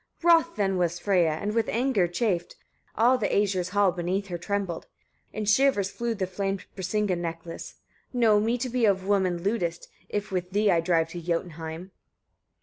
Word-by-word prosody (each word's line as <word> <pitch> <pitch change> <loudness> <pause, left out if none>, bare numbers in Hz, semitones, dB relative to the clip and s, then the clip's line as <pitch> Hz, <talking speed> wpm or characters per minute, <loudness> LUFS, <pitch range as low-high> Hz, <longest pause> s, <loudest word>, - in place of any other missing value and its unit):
14. 340 0 +6
Wroth 335 - -22
then 195 -3 0
was 175 -1 0
Freyia, 180 -3 +3
and 205 +7 -3
with 230 -1 +1
anger 235 -6 +2
chafed, 175 -1 -1 0.4
all 245 +4 +4
the 215 - +1
Æsir's 190 -3 +1
hall 200 -1 +3
beneath 185 +3 -2
her 175 - -3
trembled: 195 -3 -3 0.4
in 215 - -4
shivers 215 -3 +3
flew 235 -1 -2
the 195 -3 -1
famed 195 +1 -3
Brisinga 205 0 0
necklace. 165 -1 -6 0.4
"Know 230 -4 +4
me 225 +3 +1
to 250 +2 -2
be 245 -1 +1
of 190 -2 +2
women 185 -4 +1
lewdest, 180 -5 -2 0.2
if 205 0 -3
with 180 -1 -2
thee 205 0 +3
I 170 - +3
drive 165 -1 +1
to 175 +1 -7
Jotunheim." 165 +1 -4
195 Hz, 175 wpm, -27 LUFS, 175-215 Hz, 0.4 s, 14